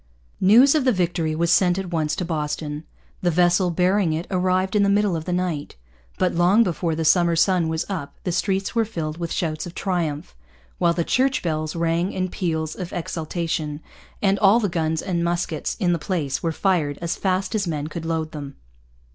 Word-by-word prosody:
News 235 Hz, +9 st, +6 dB
of 305 Hz, -3 st, +2 dB
the 255 Hz, -, +4 dB
victory 170 Hz, -5 st, 0 dB
was 170 Hz, +1 st, +1 dB
sent 180 Hz, -1 st, +4 dB
at 190 Hz, -2 st, -4 dB
once 155 Hz, -3 st, 0 dB
to 180 Hz, -, -3 dB
Boston. 150 Hz, -1 st, -3 dB, 0.4 s
The 180 Hz, -, +2 dB
vessel 175 Hz, +2 st, +3 dB
bearing 180 Hz, 0 st, +2 dB
it 160 Hz, +2 st, -3 dB
arrived 185 Hz, +1 st, +1 dB
in 210 Hz, -, +4 dB
the 200 Hz, -, +3 dB
middle 200 Hz, -2 st, +2 dB
of 160 Hz, -1 st, -4 dB
the -, -, -3 dB
night. 175 Hz, -5 st, -2 dB, 0.4 s
But 185 Hz, -, +1 dB
long 180 Hz, +7 st, +4 dB
before 170 Hz, -4 st, -1 dB
the 160 Hz, 0 st, -2 dB
summer 170 Hz, +1 st, +4 dB
sun 175 Hz, 0 st, +3 dB
was 160 Hz, +1 st, -2 dB
up 170 Hz, -8 st, -5 dB
the 180 Hz, -, -1 dB
streets 195 Hz, +3 st, -1 dB
were 230 Hz, -2 st, +2 dB
filled 165 Hz, -7 st, -5 dB
with 170 Hz, -1 st, -4 dB
shouts 155 Hz, -1 st, -2 dB
of 175 Hz, -, -10 dB
triumph, 160 Hz, -, -2 dB, 0.4 s
while 170 Hz, -, +3 dB
the 170 Hz, 0 st, 0 dB
church 260 Hz, +8 st, +1 dB
bells 155 Hz, -2 st, -2 dB
rang 170 Hz, +3 st, 0 dB
in 185 Hz, 0 st, -1 dB
peals 160 Hz, -4 st, -2 dB
of 180 Hz, -2 st, -6 dB
exultation, 160 Hz, -2 st, -3 dB, 0.4 s
and 195 Hz, 0 st, +3 dB
all 205 Hz, +3 st, +5 dB
the 205 Hz, -4 st, 0 dB
guns 160 Hz, -2 st, -1 dB
and 175 Hz, -3 st, -1 dB
muskets 170 Hz, -2 st, -2 dB
in 175 Hz, -2 st, +2 dB
the 170 Hz, -, -1 dB
place 150 Hz, -5 st, -2 dB
were 165 Hz, -, 0 dB
fired 160 Hz, -5 st, 0 dB
as 170 Hz, -1 st, -2 dB
fast 190 Hz, +2 st, -1 dB
as 205 Hz, -4 st, 0 dB
men 150 Hz, -3 st, -2 dB
could 155 Hz, +2 st, -6 dB
load 160 Hz, -1 st, -2 dB
them. 140 Hz, -2 st, -7 dB
175 Hz, 200 wpm, -23 LUFS, 160-185 Hz, 0.4 s, News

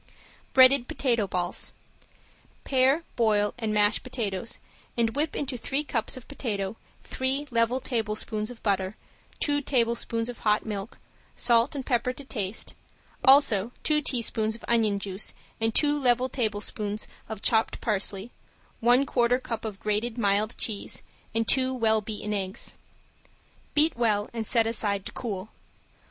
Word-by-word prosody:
~BREADED 260 Hz, -1 st, +7 dB
POTATO 235 Hz, -6 st, +1 dB
BALLS~ 180 Hz, -1 st, -1 dB, 0.9 s
Pare, 270 Hz, +4 st, +3 dB
boil 210 Hz, -3 st, +2 dB
and 220 Hz, -2 st, -1 dB
mash 210 Hz, 0 st, +3 dB
potatoes 225 Hz, -5 st, -3 dB, 0.4 s
and 230 Hz, 0 st, +1 dB
whip 300 Hz, +2 st, 0 dB
into 270 Hz, -3 st, -3 dB
three 275 Hz, +5 st, -1 dB
cups 235 Hz, -4 st, -1 dB
of 255 Hz, -, -11 dB
potato 210 Hz, -8 st, -3 dB, 0.3 s
three 270 Hz, +3 st, -1 dB
level 230 Hz, +2 st, +2 dB
tablespoons 215 Hz, -3 st, -2 dB
of 245 Hz, -2 st, -11 dB
butter, 195 Hz, -1 st, 0 dB, 0.4 s
two 290 Hz, -1 st, +1 dB
tablespoons 235 Hz, -3 st, 0 dB
of 245 Hz, -1 st, -7 dB
hot 210 Hz, -1 st, +2 dB
milk, 210 Hz, 0 st, -5 dB, 0.4 s
salt 235 Hz, +3 st, +3 dB
and 270 Hz, -2 st, -4 dB
pepper 250 Hz, -1 st, +1 dB
to 280 Hz, -, -8 dB
taste; 210 Hz, -5 st, -3 dB, 0.5 s
also 245 Hz, -6 st, +5 dB
two 300 Hz, -1 st, +2 dB
teaspoons 225 Hz, -5 st, 0 dB
of 230 Hz, -, -11 dB
onion 220 Hz, -4 st, +3 dB
juice 195 Hz, 0 st, -3 dB, 0.2 s
and 225 Hz, 0 st, +1 dB
two 295 Hz, -1 st, +3 dB
level 250 Hz, 0 st, +3 dB
tablespoons 210 Hz, -3 st, -2 dB, 0.2 s
of 220 Hz, -2 st, -6 dB
chopped 225 Hz, -1 st, +2 dB
parsley, 205 Hz, 0 st, -1 dB, 0.5 s
one 245 Hz, +4 st, +5 dB
quarter 245 Hz, -2 st, +2 dB
cup 230 Hz, -3 st, -5 dB
of 210 Hz, -3 st, -5 dB
grated 215 Hz, +3 st, -1 dB
mild 210 Hz, 0 st, +1 dB
cheese 210 Hz, -3 st, -2 dB, 0.3 s
and 225 Hz, -1 st, +1 dB
two 260 Hz, -1 st, +3 dB
well 220 Hz, -3 st, +2 dB
beaten 210 Hz, 0 st, -4 dB
eggs. 190 Hz, -1 st, -2 dB, 1.0 s
Beat 305 Hz, +2 st, +4 dB
well 215 Hz, -3 st, +1 dB
and 225 Hz, -2 st, -3 dB
set 230 Hz, -2 st, +3 dB
aside 205 Hz, -3 st, 0 dB
to -, -, -5 dB
cool. 205 Hz, -4 st, -5 dB
230 Hz, 140 wpm, -27 LUFS, 210-255 Hz, 1.0 s, ~BREADED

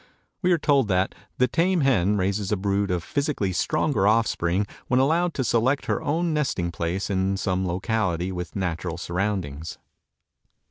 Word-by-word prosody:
We 180 Hz, -1 st, +2 dB
are 175 Hz, -, +5 dB
told 140 Hz, -6 st, +2 dB
that 95 Hz, -1 st, +1 dB, 0.2 s
the 125 Hz, -, +3 dB
tame 180 Hz, +3 st, +2 dB
hen 105 Hz, -7 st, +3 dB
raises 100 Hz, +1 st, -1 dB
a 105 Hz, -, +2 dB
brood 100 Hz, +1 st, 0 dB
of 90 Hz, -2 st, -1 dB
physically 140 Hz, -, -1 dB
stronger 140 Hz, -, +1 dB
offspring 105 Hz, -4 st, +2 dB, 0.2 s
when 125 Hz, -, +3 dB
allowed 165 Hz, +5 st, +2 dB
to 135 Hz, -, 0 dB
select 120 Hz, +4 st, +1 dB
her -, -, -1 dB
own 165 Hz, +3 st, 0 dB
nesting 135 Hz, -, -1 dB
place 85 Hz, +5 st, -2 dB
in 95 Hz, 0 st, 0 dB
some 95 Hz, -1 st, -1 dB
locality 95 Hz, -1 st, -1 dB
with 90 Hz, -2 st, -6 dB
natural 90 Hz, -3 st, -2 dB
surroundings. 85 Hz, -5 st, -3 dB
100 Hz, 155 wpm, -25 LUFS, 90-135 Hz, 0.2 s, are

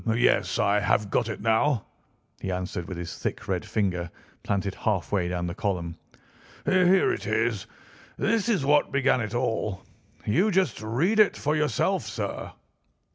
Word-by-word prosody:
"Yes, 120 Hz, -, +2 dB
I 100 Hz, +1 st, +3 dB
have 105 Hz, 0 st, +1 dB
got 115 Hz, -2 st, +1 dB
it 110 Hz, -, -5 dB
now," 115 Hz, +2 st, +2 dB, 0.5 s
he 95 Hz, -, -3 dB
answered 90 Hz, -1 st, -4 dB
with 95 Hz, -, -6 dB
his 85 Hz, -1 st, -6 dB
thick -, -, -4 dB
red -, -, -1 dB
finger 90 Hz, -5 st, -1 dB, 0.3 s
planted 100 Hz, -1 st, -1 dB
halfway 95 Hz, -3 st, 0 dB
down 90 Hz, 0 st, -2 dB
the 85 Hz, -, -3 dB
column. 90 Hz, -4 st, -2 dB, 0.7 s
"Here 190 Hz, -, +4 dB
it 380 Hz, -, -5 dB
is. -, -, 0 dB, 0.5 s
This 230 Hz, 0 st, +1 dB
is 195 Hz, -12 st, +1 dB
what 145 Hz, +1 st, +3 dB
began 135 Hz, -2 st, +2 dB
it 115 Hz, +1 st, -4 dB
all. 110 Hz, -6 st, -1 dB, 0.4 s
You 180 Hz, -, +3 dB
just 185 Hz, -, +1 dB
read 145 Hz, -, +1 dB
it 210 Hz, -, +5 dB
for 150 Hz, +2 st, 0 dB
yourself, 150 Hz, -7 st, +1 dB
sir." -, -, -4 dB
110 Hz, 155 wpm, -26 LUFS, 95-150 Hz, 0.7 s, it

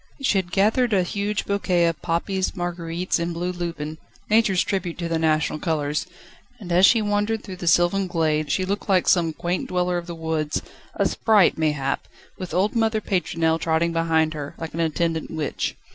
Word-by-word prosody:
She 235 Hz, -8 st, +2 dB
had 175 Hz, -2 st, -5 dB
gathered 215 Hz, +5 st, +2 dB
a 190 Hz, -2 st, +3 dB
huge 205 Hz, +2 st, -2 dB
bouquet 185 Hz, -4 st, +1 dB
of 165 Hz, -1 st, -1 dB
poppies, 185 Hz, +3 st, -1 dB
marguerites 175 Hz, 0 st, -2 dB
and 170 Hz, 0 st, -2 dB
blue 175 Hz, +2 st, -2 dB
lupin 165 Hz, -3 st, -5 dB, 0.3 s
Nature's 215 Hz, -4 st, +4 dB
tribute 185 Hz, -4 st, -2 dB
to 170 Hz, -1 st, -3 dB
the 165 Hz, -1 st, -1 dB
national 155 Hz, -1 st, +1 dB
colours 155 Hz, -1 st, -1 dB, 0.5 s
and 185 Hz, -5 st, -8 dB
as 180 Hz, +3 st, +6 dB
she 225 Hz, -2 st, +4 dB
wandered 210 Hz, +1 st, 0 dB
through 185 Hz, -3 st, -8 dB
the 175 Hz, -, -6 dB
sylvan 175 Hz, +3 st, +3 dB
glades 155 Hz, -4 st, 0 dB
she 185 Hz, -, +1 dB
looked 200 Hz, +2 st, -3 dB
like 185 Hz, -2 st, +3 dB
some 170 Hz, -3 st, +3 dB
quaint 175 Hz, +3 st, -3 dB
dweller 180 Hz, -1 st, 0 dB
of 170 Hz, -, -10 dB
the 170 Hz, -, -6 dB
woods 160 Hz, -2 st, -2 dB, 0.3 s
a -, -, +2 dB
sprite, 210 Hz, -5 st, +3 dB
mayhap 150 Hz, -4 st, -1 dB, 0.3 s
with 185 Hz, -2 st, -6 dB
old 195 Hz, +5 st, +1 dB
mother 225 Hz, -1 st, +2 dB
Pétronelle 165 Hz, -5 st, 0 dB
trotting 165 Hz, +1 st, +1 dB
behind 160 Hz, -1 st, +2 dB
her, 145 Hz, -2 st, -6 dB
like 165 Hz, -1 st, -6 dB
an 165 Hz, -, -5 dB
attendant 165 Hz, 0 st, -1 dB
witch. 155 Hz, -3 st, -3 dB
175 Hz, 185 wpm, -23 LUFS, 160-195 Hz, 0.5 s, as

